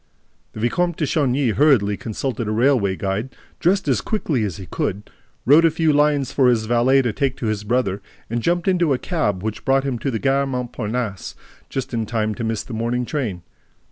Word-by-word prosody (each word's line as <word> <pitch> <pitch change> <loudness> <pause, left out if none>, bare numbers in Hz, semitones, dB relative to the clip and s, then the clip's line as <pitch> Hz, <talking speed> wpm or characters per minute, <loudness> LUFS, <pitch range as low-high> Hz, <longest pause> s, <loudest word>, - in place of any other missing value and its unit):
The - - -8
Vicomte 175 +9 0
de 155 - 0
Chagny 140 -3 +1
hurriedly 115 -7 +3
consulted 115 +2 -4
a - - -1
railway 115 -4 +2
guide, 100 +7 -3 0.2
dressed 190 0 +2
as 125 -8 +2
quickly 155 - -1
as 95 -6 -3
he 95 - -8
could, 100 +3 -4 0.3
wrote 150 +6 +6
a 165 - +6
few 160 -1 +1
lines 145 -2 +2
for 130 -3 +4
his 115 -3 +1
valet 120 +4 +3
to 120 -3 -1
take 135 +1 -1
to - - -5
his 110 -1 -1
brother 105 -3 0 0.3
and 120 +1 -2
jumped 175 +6 0
into 175 -6 +3
a - - +1
cab 105 - -1
which 110 -1 -4
brought 135 +1 +2
him 130 -4 -2
to 135 - -2
the 115 - -1
Gare 135 +2 +1
Montparnasse 120 -5 -4 0.3
just 130 -2 -4
in 115 -2 -1
time 110 -1 -1
to 115 - -5
miss 110 -1 -2
the 125 - -9
morning 120 +2 -1
train. 115 - -3
125 Hz, 205 wpm, -21 LUFS, 110-140 Hz, 0.3 s, wrote